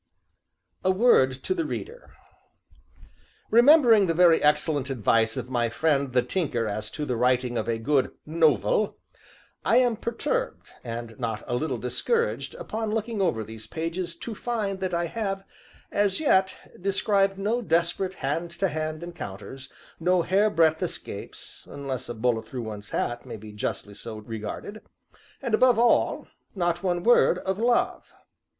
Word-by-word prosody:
A 185 - +2
WORD 185 - +4
TO - - 0
THE 345 -3 -1
READER 470 +9 -7 1.4
Remembering 235 -4 +7
the 165 - 0
very 170 -1 +5
excellent 150 -2 +2
advice 115 -1 +2
of 125 0 -5
my 120 -2 +1
friend 140 +1 0
the 125 -1 +3
Tinker 125 -5 -1
as 105 0 -3
to 150 - -4
the 125 - -1
writing 125 +1 +1
of 115 0 -2
a 115 - 0
good 130 +4 +1 0.2
"nov 155 -8 +3
el," 205 - +1 0.7
I 235 - +4
am 245 -2 +4
perturbed, - - -3
and 115 -1 -6
not 115 -3 -3
a - - -4
little 130 0 -1
discouraged, 460 - -1
upon 225 - -4
looking 225 -1 -2
over 145 -12 +1
these 110 0 -9
pages, 165 +4 -3
to 225 +6 -6
find 210 -4 -3
that 185 -2 -2
I 170 0 0
have, 195 +1 -3 0.5
as 200 -2 +1
yet, 190 -11 +2 0.2
described 195 0 +1
no 215 +5 0
desperate 175 0 0
hand 160 +5 -2
to 195 - +1
hand 155 +1 -4
encounters, 135 - -8 0.3
no 180 +1 +2
hairbreadth 170 -5 +3
escapes - - -6
(unless 135 -4 -5
a 120 - -4
bullet 110 -1 0
through 125 -3 -5
one's 105 -2 -7
hat 120 0 -2
may - - -8
be 105 0 -11
justly 105 0 -4
so 110 +2 -8
regarded), 110 - -7 0.6
and, 240 -4 -2
above 245 +1 +5
all 235 0 +2 0.3
not 175 -2 0
one 175 -2 -1
word 240 - +5
of 190 +1 -3
LOVE! 235 +1 +1
165 Hz, 155 wpm, -26 LUFS, 125-205 Hz, 1.4 s, Remembering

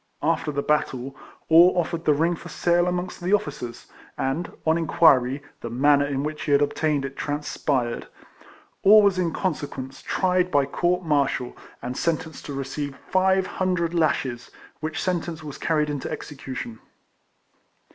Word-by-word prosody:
After 155 -1 +1
the 140 0 -2
battle, 135 -3 -1 0.3
Orr 175 +3 +6
offered 170 -1 -2
the 150 - +5
ring 165 +4 +1
for - - -11
sale 175 0 +2
amongst 180 +1 -3
the 180 +3 0
officers, 145 - -2 0.3
and, 135 +6 -2
on 160 0 +4
inquiry, 145 -5 +3 0.2
the 115 - -6
manner 145 +4 +3
in 140 -1 -2
which 150 0 -4
he 145 - 0
had 140 - +5
obtained 145 -1 0
it 135 0 -6
transpired. 145 -4 -2 0.7
Orr 210 +2 +8
was 195 -2 +3
in 170 -2 +1
consequence 140 -8 -4
tried 185 -1 +1
by 145 -4 +3
court 175 +5 0
martial, 140 -5 0 0.3
and 125 +1 -4
sentenced 160 +1 -2
to 145 - -5
receive 135 +1 -4
five 190 0 +3
hundred 180 -3 -1
lashes, 130 -7 0 0.3
which 155 0 -3
sentence 170 -3 -2
was 145 -3 -8
carried 155 -2 +1
into 145 -3 -4
execution. 125 -5 -6
150 Hz, 150 wpm, -24 LUFS, 135-175 Hz, 0.7 s, Orr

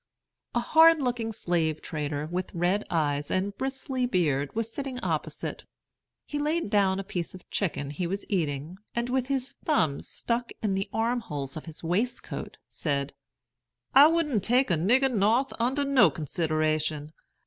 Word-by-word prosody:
A - - +4
hard 320 +6 +6
looking 245 -4 -1
slave 170 -7 0
trader, 150 -1 -3
with 180 +3 -4
red 180 +5 +1
eyes, 145 -3 0
and 200 +2 -1
bristly 265 0 -2
beard, 150 - 0
was 225 0 -1
sitting 270 0 -4
opposite. - - -3 0.6
He 295 - -4
laid 300 -5 0
down 195 -2 +3
a - - -3
piece 180 -3 -4
of 185 - -13
chicken 150 -7 -1
he 170 +4 -2
was 195 +3 -3
eating, 160 -1 -2 0.2
and 235 +1 -1
with 260 -1 0
his 270 -2 0
thumbs 160 - +1
stuck 235 0 -2
in 205 -3 +1
the 195 +1 -2
arm 235 +2 +1
holes 145 - -5
of 155 - -7
his 160 -1 -9
waistcoat, 195 +9 -2
said: 140 -2 -2 0.8
"I 280 +3 +9
wouldn't 305 - +1
take 250 0 +3
a - - +4
nigger 250 +11 +3
North 225 +6 +2
under 260 +5 +1
no 260 -9 +5
consideration. 155 0 -1
195 Hz, 160 wpm, -27 LUFS, 155-250 Hz, 0.8 s, I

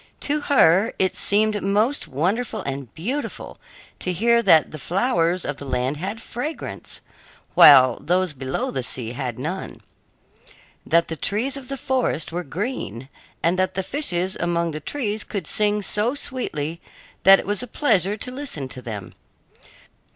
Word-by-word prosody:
To 295 +1 0
her 220 - +4
it 190 -1 +1
seemed 210 0 +2
most 210 +8 +1
wonderful 185 - -1
and 135 -2 -5
beautiful 245 - -4 0.4
to 180 - -2
hear 235 +6 +3
that 160 -8 +5
the 155 - -7
flowers 180 - 0
of 145 - -3
the 140 - -8
land 130 +2 -1
had 195 +7 -4
fragrance, 250 +7 -6 0.5
while 130 -4 +8
those 180 0 +1
below 130 -1 -3
the 130 - -2
sea 120 -2 -4
had 125 -2 -4
none; 160 +9 -5 1.1
that 170 +1 +3
the 160 - -4
trees 220 - -2
of 270 -2 -7
the 275 - -4
forest 255 - -1
were 175 +2 -3
green; 145 - -5 0.3
and 175 +3 +2
that 185 0 0
the 190 - -1
fishes 185 - -1
among 170 -1 0
the 155 - -5
trees 215 - -2
could 200 -6 -5
sing 210 +3 +1
so 215 +7 +2
sweetly 170 - -3 0.4
that 195 0 +8
it - - -5
was 205 +2 -1
a 250 - -6
pleasure 205 - +2
to 250 - -4
listen 255 - -5
to 130 - -8
them. 105 -6 -7
185 Hz, 160 wpm, -23 LUFS, 150-225 Hz, 1.1 s, while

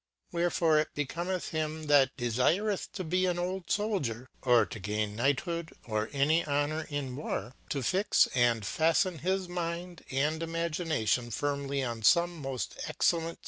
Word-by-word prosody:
Wherefore 170 -2 +2
it 155 - -2
becomethhim 155 0 -2
that 140 -2 +4
defireih 140 - +1
to 185 - -4
be 185 +3 +1
an 175 -1 0
old 180 0 -3
Souldietjorto 125 - 0
gain 105 +1 -2
Knight 135 +4 +2
hood 170 -2 -4
or 110 -1 -1
any 150 +4 +3
honour 145 +2 0
in 140 -4 -3
war, 135 -3 -4 0.2
to 140 -2 -2
fix 190 - +3
and 120 -3 +3
faften 165 - +1
his 190 +1 0
mindc 175 -1 -4
and 150 +4 0
Imadnation 165 - -1
firmly 140 +1 -1
upon 115 -3 -3
fome 170 +11 +5
moil 135 -1 -3
excellent 120 - -5 0.4
ftouc - - -5
Occult 165 0 -5
Thihfophy. - - -31
155 Hz, 150 wpm, -30 LUFS, 130-170 Hz, 0.4 s, fome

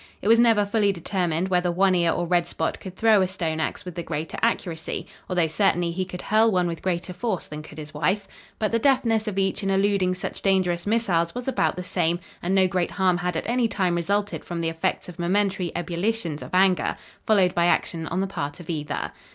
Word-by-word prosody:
It - - -4
was 230 +1 +6
never 225 -3 +5
fully 205 0 +2
determined 180 -1 -1
whether 180 -1 +2
One 190 +2 +3
Ear 170 -2 +3
or 175 - -1
Red 175 0 +1
Spot 160 -1 -2
could 185 -1 -9
throw 220 -1 +4
a 185 - +2
stone 165 -4 -3
ax 160 - -3
with 180 - -6
the 170 - -4
greater 160 -1 -4
accuracy, 175 -8 -1 0.2
although 180 -3 +2
certainly 175 +1 +1
he 185 +2 -2
could 180 -1 -8
hurl 220 +1 +4
one 180 -2 +2
with 165 -1 -4
greater 180 0 -2
force 215 -2 -2
than 150 0 -7
could 155 - -13
his 155 0 -8
wife. 190 +6 0 0.3
But 215 - 0
the 230 - +2
deftness 230 -4 +2
of 200 -2 -3
each 195 +1 0
in 195 - -1
eluding 195 -1 +2
such 185 - -5
dangerous 185 -2 +1
missiles 190 -6 +1
was 245 +1 -5
about 265 - +1
the 180 - -5
same, 175 -1 0 0.2
and 185 +2 0
no 190 -1 +5
great 180 -1 0
harm 185 -2 +2
had 175 -1 -1
at - - -3
any 240 0 +2
time 185 -5 0
resulted 200 +4 -1
from 170 -1 -4
the 165 - 0
effects 165 +3 -2
of 175 -1 -10
momentary 190 0 +1
ebullitions 175 -2 -2
of - - -8
anger, 185 -1 +3 0.3
followed 195 -5 +4
by 170 0 +2
action 165 -2 0
on 185 +4 -1
the - - +1
part 145 -5 -5
of 175 -1 -6
either. 150 -2 -3
185 Hz, 225 wpm, -24 LUFS, 170-200 Hz, 0.3 s, was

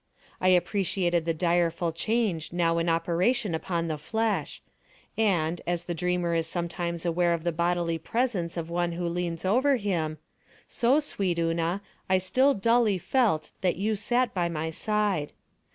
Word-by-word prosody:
I 185 - +1
appreciated 180 -2 +2
the 165 - +1
direful 170 0 +1
change 195 -2 -1
now 170 -1 +1
in 165 +1 0
operation 175 +6 +1
upon 165 +1 -2
the 155 -2 -3
flesh, 220 +7 -1 0.6
and, 175 -6 +1
as 175 0 -1
the 175 - -3
dreamer 175 0 0
is 165 -1 0
sometimes 170 0 -3
aware 170 0 +2
of 165 - -7
the 170 - +1
bodily 170 0 0
presence 195 -4 -1
of 165 -1 -3
one 170 0 -1
who 175 +1 -3
leans 170 0 -3
over 260 +8 +3
him, 170 -9 -1 0.5
so, 250 +5 +2
sweet 195 - -1
Una, 165 +3 0 0.3
I 190 - +5
still 255 +10 +3
dully 230 -1 +3
felt 195 -5 +1
that 185 -2 +1
you 215 +4 0
sat 240 +3 0
by 175 -2 0
my 160 0 -3
side. 205 -4 -1
175 Hz, 155 wpm, -27 LUFS, 170-205 Hz, 0.6 s, I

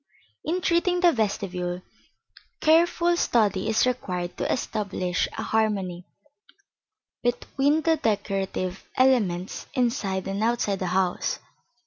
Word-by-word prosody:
In 355 +3 -1
treating 355 +1 +2
the 350 -2 +6
vestibule, 185 - -2 0.8
careful 340 +2 +4
study 215 - +1
is 220 - +3
required 180 -8 -2
to - - -1
establish 195 -6 -1
a - - -2
harmony 195 -5 -1 1.1
between 280 +5 +1
the 325 -1 +3
decorative 195 -5 -2
elements 210 -9 +2
inside 230 -7 0
and 195 +2 -2
outside 225 -4 +1
the 185 - -2
house. 180 0 0
215 Hz, 105 wpm, -25 LUFS, 185-265 Hz, 1.1 s, the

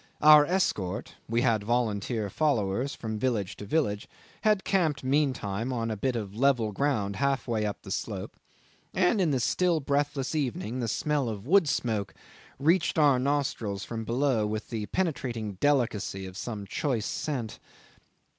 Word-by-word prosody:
Our 150 -1 +9
escort 105 - -1 0.2
(we 115 +1 +2
had 115 -5 +2
volunteer 110 -1 0
followers 125 -3 0
from 110 -2 -4
village 110 -6 -1
to 105 - -7
village) 105 -5 0 0.3
had 210 -3 +3
camped 160 -8 +1
meantime 130 -5 0
on 115 -2 -1
a - - -1
bit 125 +5 -1
of 105 -4 -4
level 125 -3 +2
ground 105 -5 0
half 140 -1 0
way 110 -3 0
up 105 - -5
the - - -8
slope, - - -4 0.6
and 190 +3 +3
in 175 - +3
the 135 -3 +1
still 175 +6 +2
breathless 140 -1 -1
evening 125 -6 -2
the 120 - -1
smell 145 +2 0
of 105 -1 -6
wood 175 +1 +4
smoke 110 -7 -1 0.4
reached 165 +6 +2
our 145 -4 +5
nostrils 130 -8 -1
from 115 -1 -4
below 120 -1 +1
with 110 +2 -4
the 110 -3 -3
penetrating 120 - -2
delicacy 115 -9 +1
of 95 -1 -9
some 105 -1 -5
choice 120 - -1
scent. 125 -6 -3
125 Hz, 155 wpm, -28 LUFS, 105-145 Hz, 0.6 s, Our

